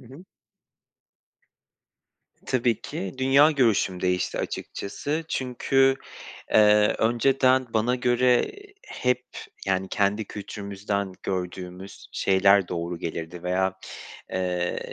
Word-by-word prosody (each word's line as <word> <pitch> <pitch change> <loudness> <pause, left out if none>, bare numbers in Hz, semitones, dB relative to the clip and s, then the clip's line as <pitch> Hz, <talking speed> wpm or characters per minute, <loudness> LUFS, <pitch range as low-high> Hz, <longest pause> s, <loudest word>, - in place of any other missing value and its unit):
Hı 125 - -16
hı. 140 +9 -13 2.2
Tabii 120 -3 +1
ki. 95 -6 -6
Dünya 135 +3 +5
görüşüm 115 - +1
değişti 90 -1 0
açıkçası. 150 +10 -4
Çünkü, 135 +1 +2 0.6
eee, 105 0 +5
önceden 130 +3 +3
bana 115 +3 +2
göre 125 - +2 0.4
hep, 125 0 -1 0.4
yani 95 0 0
kendi 105 +3 0
kültürümüzden 100 -1 -4
gördüğümüz 90 0 -6
şeyler 100 -1 +3
doğru 85 0 -4
gelirdi 85 +1 -6
veya, 95 +1 0 0.6
eee, 90 -1 -1
105 Hz, 90 wpm, -25 LUFS, 95-125 Hz, 2.2 s, Dünya